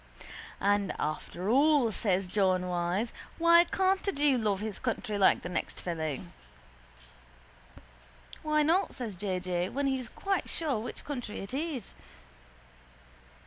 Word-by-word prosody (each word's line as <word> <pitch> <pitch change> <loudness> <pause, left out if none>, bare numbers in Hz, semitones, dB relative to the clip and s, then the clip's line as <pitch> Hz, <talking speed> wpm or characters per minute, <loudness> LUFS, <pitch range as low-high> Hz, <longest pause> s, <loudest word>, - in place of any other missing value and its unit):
—And 200 0 +1
after 165 +4 -3
all, 275 0 +4
says 195 -3 0
John 185 -1 +2
Wyse, 180 +5 -1 0.2
why 340 +1 +6
can't 380 +2 +1
a - - +3
jew 290 -4 +3
love 210 -5 0
his 215 -1 -4
country 225 -3 -2
like 195 -2 +4
the - - -4
next 180 - -3
fellow? 160 -5 -3 2.2
—Why 305 -1 +2
not? 340 +6 +2
says 230 -6 -5
J. 185 0 -2
J., 180 0 -1
when 280 +1 -1
he's 265 -3 -1
quite 390 -2 -2
sure 295 -9 -1
which 230 - -7
country 245 -7 -5
it 195 +4 -7
is. 280 - -3
220 Hz, 135 wpm, -30 LUFS, 185-295 Hz, 2.2 s, why